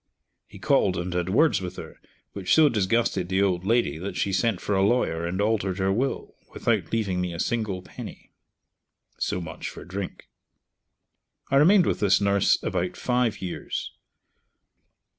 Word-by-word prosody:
He - - -13
called 95 - +2
and 90 +1 -3
had 90 0 -1
words 150 +4 +3
with 90 0 -6
her, - - -10 0.3
which 95 -2 +1
so 155 -2 +6
disgusted 100 -4 0
the 95 +1 +2
old 90 -3 0
lady 115 -10 +1
that 95 +3 -5
she 100 - 0
sent 100 0 +1
for 105 - -2
a 95 - +2
lawyer 95 -6 +1
and 90 +2 -3
altered 100 -3 0
her 95 0 +1
will, 130 +6 -2 0.2
without - - 0
leaving 100 -5 0
me 90 -1 -3
a - - -7
single 105 -4 -2
penny. - - -10 0.9
(So - - -1
much 85 - -6
for - - -10
drink.) 95 +1 -6 1.2
I 135 - +4
remained 175 +6 +6
with - - 0
this 100 -2 +4
nurse 100 -1 +3
about 90 +1 -2
five 125 -5 0
years. 90 - -4
100 Hz, 160 wpm, -25 LUFS, 90-115 Hz, 1.2 s, so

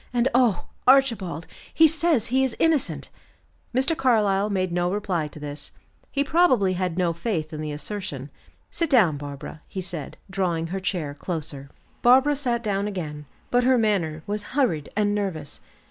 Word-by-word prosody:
And, 245 0 +2
oh, 240 -7 +3 0.2
Archibald! 230 - +3 0.3
He 320 - +6
says 315 -7 +1
he 265 0 +4
is 260 -3 0
innocent." 325 -4 +1 0.6
Mr. 265 +6 +2
Carlyle 210 -7 +2
made 185 -3 0
no 175 +1 0
reply 185 -6 -1
to 150 - -12
this. 145 0 -7 0.4
He 280 - +1
probably 260 - +3
had 180 -2 -2
no 175 -2 +1
faith 165 -4 -3
in 155 - -4
the 155 -1 -3
assertion. 145 -3 -6 0.4
"Sit 335 -2 -1
down, 200 - +4
Barbara," 145 +1 -8
he 190 - -6
said 170 -5 -5
drawing 180 -4 -1
her 195 - -1
chair 175 -6 -2
closer. 145 -4 -5 0.3
Barbara 265 +4 +5
sat 245 -4 -1
down 200 -1 0
again, 150 -7 -5 0.2
but 245 0 +3
her 255 +1 +4
manner 180 -9 0
was 205 0 -2 0.2
hurried 165 - +1
and 205 -1 +2
nervous. 180 -8 -3
195 Hz, 160 wpm, -24 LUFS, 160-245 Hz, 0.6 s, He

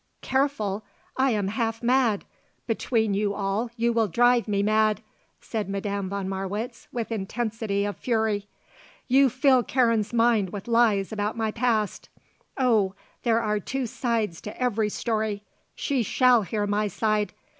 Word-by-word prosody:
"Careful! 260 -7 0 0.3
I 265 +1 +3
am 205 -5 0
half 225 +1 -2
mad! 240 -4 +2 0.4
Between 225 -2 0
you 200 0 0
all 205 +4 -1
you 235 +1 +2
will 225 -2 +2
drive 245 +4 +3
me 200 -1 +1
mad!" 215 0 +2 0.4
said 215 -4 -4
Madame 200 -1 -2
von 200 -1 -3
Marwitz 200 +5 -4
with 235 -2 -4
intensity 220 -1 -2
of 205 - -4
fury. 220 -4 0 0.6
"You 265 +1 +5
fill 260 +1 +4
Karen's 230 -4 +1
mind 230 -4 +3
with 200 +3 -7
lies 230 -4 +3
about 210 +1 -2
my 220 -1 0
past 225 -3 -1 0.5
oh, 220 -7 +2 0.3
there 230 -1 +2
are 210 0 0
two 265 +6 -3
sides 230 -7 -2
to 210 - -8
every 225 -4 +1
story! 215 -2 -2 0.3
she 275 -4 0
shall 245 +2 +4
hear 205 +2 -2
my 205 +1 0
side! 210 +1 0
220 Hz, 145 wpm, -26 LUFS, 205-240 Hz, 0.6 s, You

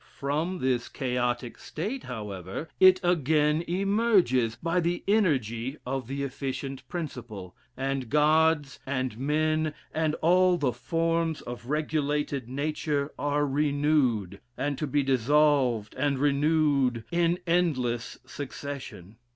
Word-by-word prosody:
From 155 +7 -1
this 130 -6 0
chaotic 125 -2 -2
state, 215 - -5
however, 105 - -6
it 185 0 +7
again 155 -2 +2
emerges, 185 - +2
by 170 +2 0
the 175 +1 -1
energy 135 - +1
of 130 -1 -3
the 140 +2 -3
efficient 135 0 -4
principle, 120 - -6 0.2
and 135 -2 -2
gods, 150 -1 +3
and 130 -3 -2
men, 155 +2 0 0.2
and 155 -1 0
all 180 +1 +4
the 140 -7 0
forms 165 +4 -1
of 120 0 -8
regulated 150 -3 -1
nature, 145 +1 -2
are 145 0 +1
renewed, 140 - +1 0.2
and 145 0 -1
to 150 - -1
be 145 +1 +1
dissolved 130 -3 +2
and 145 -2 0
renewed 140 -3 +2
in 170 0 +2
endless 135 -10 0
succession. 130 -7 -7
145 Hz, 115 wpm, -27 LUFS, 125-160 Hz, 0.2 s, it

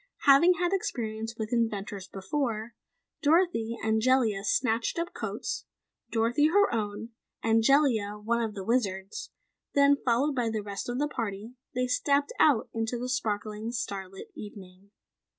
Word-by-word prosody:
Having 310 +6 +7
had 355 +2 0
experience 225 - -3
with 220 +1 -4
inventors 210 -4 -1
before, 225 +2 -3 0.5
Dorothy 300 -8 +2
and 220 0 +2
Jellia 230 -5 +2
snatched 230 +4 +1
up 340 +1 -3
coats, - - -4 0.4
Dorothy, 235 +6 +2
her 405 -1 +3
own, 215 0 -3 0.3
and 225 0 +3
Jellia, 225 -6 +3
one 230 +3 0
of 220 -2 -3
the 195 - -5
Wizard's. 195 -5 -1 0.5
Then, 280 0 +6
followed 270 +2 +1
by 245 -3 0
the 220 -2 -3
rest 200 +3 -5
of 245 - -2
the 295 +2 +1
party, 220 -4 -5 0.2
they 250 0 +1
stepped 280 +3 +1
out 285 -8 +4
into 225 +1 -2
the 250 +1 -4
sparkling, 215 -2 -2
starlit 195 -5 -5
evening. 195 -2 -11
230 Hz, 145 wpm, -28 LUFS, 210-265 Hz, 0.5 s, Having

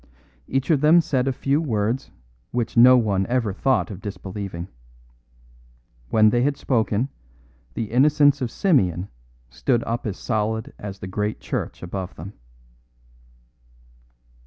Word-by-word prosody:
Each 135 +4 0
of 145 -4 +3
them 155 +3 +6
said 135 -5 0
a - - +2
few 140 +3 0
words 115 -3 -1 0.4
which 120 -2 -2
no 125 +2 +8
one 100 -5 +1
ever 120 -5 0
thought 130 +2 +1
of 100 -1 -8
disbelieving. 95 -3 -6 1.4
When 110 +4 +5
they 120 - +2
had 140 +2 +1
spoken, 115 0 0 0.7
the 110 -2 -4
innocence 145 +2 +4
of 125 - -1
Simeon 100 - +1 0.4
stood 115 - 0
up 115 0 -3
as 100 - -4
solid 110 -1 -2
as 100 -1 -7
the 95 - -8
great 105 +3 -3
church - - -5
above 90 0 -5
them. 95 +6 -9
110 Hz, 135 wpm, -23 LUFS, 100-130 Hz, 1.4 s, no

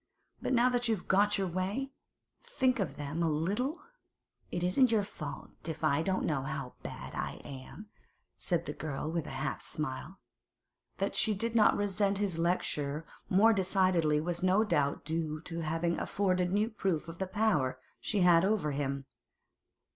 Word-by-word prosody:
But - - 0
now 250 +1 +4
you've 225 -6 -1
got 205 +2 +4
your 195 - 0
way, 190 +10 -2 0.5
think 260 - +1
of 155 -8 -2
them 150 +3 -3
a 165 - +2
little.' 205 - -1 0.7
'It 175 - -3
isn't 220 +9 +4
your 215 -3 +3
fault 155 -7 -7
if 160 -1 -5
I 150 -1 +3
don't 190 +3 0
know 150 -4 0
how 135 -2 -4
bad - - -7
I - - -3
am,' 140 +9 -9 0.5
said 175 -3 -1
the 145 - -3
girl 150 0 -4
with 165 -2 -2
a 135 - -5
half 145 - -2
smile. 155 +5 -4 0.8
That - - -1
she 215 -2 +3
did 230 +4 -2
not 220 - +5
resent 200 0 +1
his 195 -5 -1
lecture 155 -3 0 0.2
more 220 +5 +6
decidedly 185 -6 +3
was 170 +3 -2
no 185 +4 +4
doubt 145 -11 0
due 155 -1 -2
to 165 +1 -5
its 160 - -3
having 165 +2 0
afforded 185 -3 +1
new 210 +4 +1
proof 190 -7 -1
of 165 0 -8
the 190 - -1
power 185 -10 +1 0.2
she 205 -3 -1
had 175 -1 +6
over 195 -6 +1
him. 140 -1 -2
180 Hz, 170 wpm, -32 LUFS, 155-205 Hz, 0.8 s, more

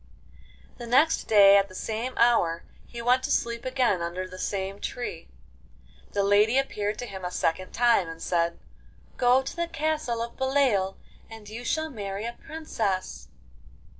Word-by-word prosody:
The 240 - -7
next 280 +7 +3
day 200 -2 +7
at 200 0 +2
the 185 - -13
same 225 +6 -4
hour 180 -9 +3 0.2
he 235 -1 -8
went 250 +2 +3
to - - -3
sleep 235 +1 -1
again 255 -8 +1
under 175 +2 -3
the 185 0 -11
same 195 0 -3
tree. 245 - -5 0.9
The 200 - +1
lady 205 +5 +4
appeared 210 -6 -1
to 245 - -5
him 190 -5 -8
a 180 - -2
second 180 +1 -1
time, 235 -8 +3
and 165 0 -8
said: 170 0 0 0.6
'Go 250 +2 +4
to - - -6
the 340 0 -1
castle 305 -8 -1
of 235 - -8
Beloeil, 265 -8 +1 0.3
and 225 -2 -11
you 225 +3 -7
shall 315 +5 -1
marry 200 -3 -5
a 235 - -4
princess. 230 -12 -4
225 Hz, 165 wpm, -26 LUFS, 195-250 Hz, 0.9 s, day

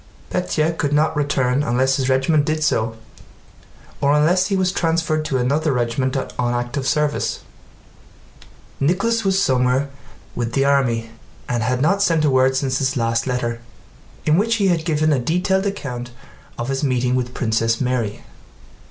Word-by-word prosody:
Pétya 160 +2 0
could 145 -3 -1
not 155 +2 +2
return 140 -2 +1
unless 130 -1 +1
his 135 -1 -1
regiment 135 +3 +2
did 155 +1 -1
so 115 -6 0 1.1
or 140 +1 +3
unless 175 +5 +3
he 195 - 0
was 185 -1 +1
transferred 165 -3 0
to 135 - -1
another 145 +5 +1
regiment 130 +2 -1
on 125 -2 -2
active 120 +3 -3
service. 150 -1 0 1.4
Nicholas 200 +10 +1
was 195 -1 +2
somewhere 130 -5 +1 0.4
with 120 -1 -3
the 135 +2 +2
army 120 -5 +1 0.4
and 120 -2 -1
had 125 +4 0
not 195 +6 +2
sent 165 -5 +2
a 145 - +3
word 130 0 +3
since 130 -1 0
his 135 0 0
last 115 0 0
letter, 120 -2 -2 0.6
in 155 +3 +3
which 230 +2 +1
he 200 -3 +2
had 165 -3 0
given 155 -2 +2
a 135 - +1
detailed 180 +8 0
account 125 -11 -5 0.5
of 120 +2 -4
his 135 +1 -2
meeting 125 -2 +1
with 125 -1 -2
Princess 115 -1 0
Mary. 125 -5 -2
135 Hz, 160 wpm, -20 LUFS, 125-155 Hz, 1.4 s, or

